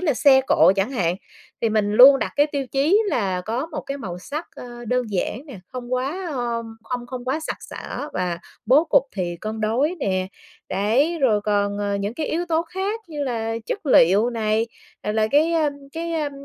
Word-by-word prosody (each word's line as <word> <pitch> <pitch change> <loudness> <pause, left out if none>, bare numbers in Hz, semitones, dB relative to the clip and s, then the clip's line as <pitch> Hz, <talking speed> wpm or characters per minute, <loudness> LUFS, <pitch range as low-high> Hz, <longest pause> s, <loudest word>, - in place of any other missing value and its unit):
là 310 -8 +1
xe 265 +1 +6
cộ 170 +4 +5
chẳng 195 +5 0
hạn, 180 -9 0 0.5
thì 230 - +3
mình 210 -1 +1
luôn 265 +5 +9
đặt - - -2
cái 290 +1 +5
tiêu 280 -2 -2
chí 285 +10 +3
là 190 - 0
có 230 - -3
một 330 - -5
cái 275 - -5
màu 180 -9 -6
sắc, 295 - -6
ơ, 240 -1 -9
đơn 250 +2 +1
giản 215 - -2
nè, 265 -8 -9
không 250 -1 -6
quá, 285 +9 -2
ơ, 240 -3 -2 0.3
không 245 -1 -3
không 250 0 -7
quá 270 +5 -1
sặc 315 - -4
sỡ 290 - -7
và 180 -2 -2 0.3
bố 275 +7 +5
cục 280 - +4
thì 175 -3 -3
cân 220 +1 -4
đối 250 +10 +1
nè. 185 -4 0 0.4
Đấy, 260 - +1
rồi 230 -8 +3
còn, 205 -1 0
ờ, 205 -1 -1
những 200 +3 -3
cái 305 +3 -3
yếu 340 +2 -1
tố 325 0 +2
khác 385 +6 -3
như 300 -3 -4
là 225 -3 -2
chất 405 - -4
liệu 205 -1 +5
này, 220 -1 0 0.4
rồi 210 - -2
là 220 0 +2
cái, 310 +4 +3
a, 315 -3 +2 0.2
cái, 335 +1 -4
a, 305 -3 -1
245 Hz, 210 wpm, -22 LUFS, 210-295 Hz, 0.5 s, luôn